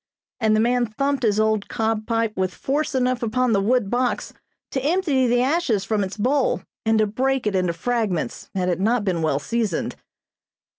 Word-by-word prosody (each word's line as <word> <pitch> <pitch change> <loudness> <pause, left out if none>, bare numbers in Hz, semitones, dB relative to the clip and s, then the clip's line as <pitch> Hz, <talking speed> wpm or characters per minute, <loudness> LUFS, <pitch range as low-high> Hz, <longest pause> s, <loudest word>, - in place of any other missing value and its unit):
and 220 -2 +3
the - - +2
man 240 +1 +2
thumped 275 +5 -1
his 215 -3 +2
old 215 -1 +1
cob 220 -1 -1
pipe 230 -2 0
with 185 -1 -1
force 290 +1 -1
enough 255 -1 +1
upon 250 +2 +1
the 200 - +3
wood 235 +1 +2
box 245 0 -1 0.4
to 265 - -1
empty 295 -5 +2
the 245 +1 +3
ashes 260 - +1
from 210 -1 0
its 190 +2 -5
bowl 260 +5 +1 0.2
and 220 0 +2
to 215 - +4
break 260 +5 0
it 210 -2 0
into 180 -2 +1
fragments 215 -2 -2
had 185 -1 0
it 180 -1 0
not 225 +3 +2
been 180 -4 0
well 155 -3 +1
seasoned. 220 +2 -2
225 Hz, 190 wpm, -23 LUFS, 205-255 Hz, 0.4 s, to